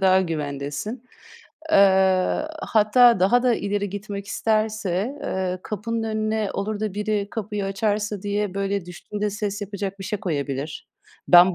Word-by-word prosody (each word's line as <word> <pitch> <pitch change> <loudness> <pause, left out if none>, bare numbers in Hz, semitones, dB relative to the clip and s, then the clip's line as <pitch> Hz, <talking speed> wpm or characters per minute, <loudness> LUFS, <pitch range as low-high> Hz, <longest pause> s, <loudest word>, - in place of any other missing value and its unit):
daha 190 0 +5
güvendesin. 150 - -4 0.7
Eee, 190 +1 +4 0.2
hatta 225 0 +5
daha 240 +7 +4
da 250 -2 +4
ileri 205 -1 -2
gitmek 200 0 -6
isterse, 215 +2 0
eee, 185 -6 -2
kapının 225 +2 -3
önüne 215 -1 -1
olur 210 +1 -3
da 215 -3 -2
biri 210 -1 -1
kapıyı 210 -2 -3
açarsa 205 +1 -1
diye 205 -1 -1
böyle 200 -1 -1
düştüğünde 205 +4 -4
ses 205 0 -3
yapacak 200 -1 -4
bir 195 - -7
şey 210 0 -3
koyabilir. 145 -4 -3 0.4
Ben 180 +1 +8
200 Hz, 135 wpm, -24 LUFS, 190-215 Hz, 0.7 s, Ben